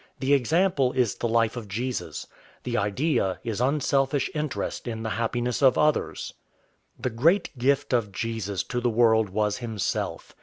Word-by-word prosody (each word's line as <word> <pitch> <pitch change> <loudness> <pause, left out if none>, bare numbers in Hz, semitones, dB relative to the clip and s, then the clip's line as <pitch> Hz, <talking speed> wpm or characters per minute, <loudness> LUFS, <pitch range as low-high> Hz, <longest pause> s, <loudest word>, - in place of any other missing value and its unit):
The 135 +1 +2
example 140 0 +2
is 120 -6 +2
the 120 - -2
life 115 0 +2
of 115 -4 -6
Jesus. 120 +6 -4 0.4
The 120 -1 -3
idea 105 - 0
is 115 -2 -3
unselfish 135 +1 +1
interest 150 -4 -3
in 110 -1 -4
the 110 - -2
happiness 120 +2 -1
of 135 -2 +5
others. 150 0 0 0.7
The 130 - -2
great 160 - +2
gift 140 +2 +1
of 115 -5 +1
Jesus 105 -2 -3
to 125 -1 -3
the 120 - +2
world 110 -2 +3
was 105 +1 0
himself. 110 -5 -3
120 Hz, 155 wpm, -26 LUFS, 110-135 Hz, 0.7 s, of